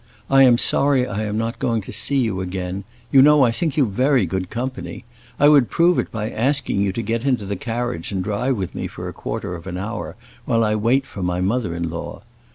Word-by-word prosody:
I 135 Hz, 0 st, +6 dB
am 125 Hz, -3 st, +6 dB
sorry 135 Hz, 0 st, +2 dB
I 105 Hz, -2 st, -3 dB
am 105 Hz, 0 st, -2 dB
not 115 Hz, +1 st, -2 dB
going 115 Hz, -4 st, 0 dB
to -, -, -9 dB
see 125 Hz, +6 st, 0 dB
you 110 Hz, -8 st, 0 dB
again; 95 Hz, +1 st, -4 dB, 0.3 s
you 135 Hz, -, +7 dB
know 150 Hz, 0 st, +6 dB
I 120 Hz, -, +4 dB
think 160 Hz, +4 st, -2 dB
you 140 Hz, -, +4 dB
very 130 Hz, +5 st, +2 dB
good 95 Hz, -1 st, -3 dB
company. 125 Hz, 0 st, -5 dB, 0.3 s
I 145 Hz, -, +6 dB
would 145 Hz, -5 st, +5 dB
prove 175 Hz, +1 st, +3 dB
it -, -, -2 dB
by 110 Hz, -1 st, -3 dB
asking 135 Hz, -4 st, 0 dB
you 100 Hz, -1 st, +1 dB
to 115 Hz, +5 st, -4 dB
get 115 Hz, +2 st, -2 dB
into 125 Hz, -7 st, 0 dB
the 100 Hz, +1 st, -3 dB
carriage 115 Hz, -5 st, -3 dB
and 95 Hz, -2 st, -2 dB
drive 110 Hz, +6 st, -1 dB
with 95 Hz, -3 st, -4 dB
me -, -, -4 dB
for -, -, -8 dB
a -, -, -6 dB
quarter -, -, -5 dB
of 85 Hz, +1 st, -8 dB
an 90 Hz, -1 st, -4 dB
hour, 105 Hz, +5 st, -5 dB, 0.3 s
while 115 Hz, -2 st, +2 dB
I 105 Hz, -1 st, +1 dB
wait 120 Hz, +6 st, +2 dB
for 100 Hz, -, -8 dB
my 90 Hz, 0 st, -1 dB
mother 100 Hz, -1 st, -1 dB
in 85 Hz, 0 st, -2 dB
law. 85 Hz, -, -7 dB
115 Hz, 235 wpm, -21 LUFS, 95-130 Hz, 0.3 s, you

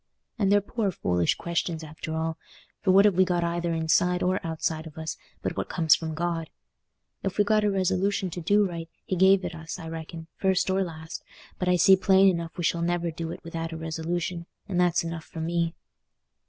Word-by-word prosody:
And 200 Hz, -2 st, +3 dB
they're 205 Hz, 0 st, +5 dB
poor 210 Hz, 0 st, -1 dB
foolish 90 Hz, -, +1 dB
questions 170 Hz, -1 st, -2 dB
after 160 Hz, +1 st, -6 dB
all; 160 Hz, 0 st, -2 dB, 0.4 s
for 200 Hz, -, -1 dB
what 195 Hz, +2 st, +7 dB
have 205 Hz, -, +5 dB
we 185 Hz, +1 st, +5 dB
got 175 Hz, -2 st, 0 dB
either 170 Hz, 0 st, -1 dB
inside 165 Hz, +2 st, +2 dB
or 185 Hz, +1 st, +1 dB
outside 160 Hz, 0 st, -2 dB
of 155 Hz, 0 st, -13 dB
us 160 Hz, 0 st, -4 dB, 0.3 s
but -, -, -2 dB
what -, -, -3 dB
comes 160 Hz, -3 st, +4 dB
from 160 Hz, -1 st, -1 dB
God? 165 Hz, -1 st, -2 dB, 0.7 s
If 195 Hz, -, -3 dB
we've 205 Hz, -, +4 dB
got 215 Hz, 0 st, +3 dB
a 210 Hz, -, +3 dB
resolution 190 Hz, 0 st, 0 dB
to 175 Hz, -, -5 dB
do 205 Hz, +5 st, +3 dB
right, 165 Hz, -2 st, -6 dB, 0.2 s
He 185 Hz, -, -1 dB
gave 190 Hz, +1 st, +5 dB
it 175 Hz, -, -4 dB
us, 160 Hz, +1 st, -7 dB
I 165 Hz, -3 st, -8 dB
reckon, 160 Hz, 0 st, -7 dB
first 190 Hz, -1 st, +2 dB
or 190 Hz, +1 st, +2 dB
last; 160 Hz, -2 st, -7 dB, 0.4 s
but 180 Hz, -, 0 dB
I 180 Hz, -, +5 dB
see 190 Hz, +2 st, +7 dB
plain 190 Hz, +1 st, +5 dB
enough 170 Hz, -1 st, -3 dB
we 175 Hz, -, -3 dB
shall 170 Hz, 0 st, +1 dB
never 175 Hz, 0 st, 0 dB
do 165 Hz, 0 st, -5 dB
it -, -, -8 dB
without 165 Hz, 0 st, -5 dB
a -, -, -5 dB
resolution, 165 Hz, +2 st, -3 dB, 0.2 s
and 180 Hz, -3 st, +1 dB
that's 175 Hz, -1 st, +2 dB
enough 165 Hz, -1 st, -5 dB
for 165 Hz, -, -9 dB
me." 170 Hz, +1 st, -1 dB
170 Hz, 210 wpm, -27 LUFS, 160-185 Hz, 0.7 s, what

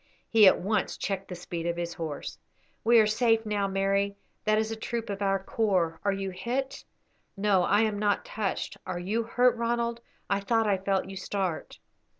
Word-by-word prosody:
He 220 Hz, -3 st, +7 dB
at -, -, +6 dB
once 200 Hz, +1 st, -1 dB
checked 195 Hz, -1 st, -3 dB
the 180 Hz, -, -6 dB
speed 170 Hz, -1 st, -5 dB
of 170 Hz, 0 st, -1 dB
his 170 Hz, 0 st, -3 dB
horse. 160 Hz, -4 st, -6 dB, 0.4 s
"We 235 Hz, +1 st, +5 dB
are 220 Hz, -, +7 dB
safe 225 Hz, +1 st, +2 dB
now, 205 Hz, -2 st, 0 dB
Mary; 195 Hz, +1 st, 0 dB, 0.3 s
that 215 Hz, 0 st, +3 dB
is 220 Hz, 0 st, 0 dB
a -, -, -2 dB
troop 225 Hz, 0 st, -4 dB
of 200 Hz, 0 st, -5 dB
our 195 Hz, -1 st, +2 dB
corps. 190 Hz, -5 st, 0 dB
Are 200 Hz, -, +2 dB
you 195 Hz, -1 st, -3 dB
hit?" 255 Hz, +8 st, -3 dB, 0.5 s
"No, 195 Hz, -2 st, +3 dB
I 205 Hz, +4 st, +3 dB
am 215 Hz, -2 st, 0 dB
not 205 Hz, -1 st, +1 dB
touched. 210 Hz, -3 st, -3 dB
Are 185 Hz, -, -3 dB
you 200 Hz, +6 st, -1 dB
hurt, 245 Hz, +2 st, +3 dB
Ronald? 235 Hz, 0 st, -1 dB, 0.3 s
I 200 Hz, -, +1 dB
thought 225 Hz, +3 st, +1 dB
I 200 Hz, -3 st, +2 dB
felt 195 Hz, 0 st, 0 dB
you 195 Hz, 0 st, -7 dB
start." 190 Hz, -3 st, -3 dB
200 Hz, 190 wpm, -28 LUFS, 190-225 Hz, 0.5 s, He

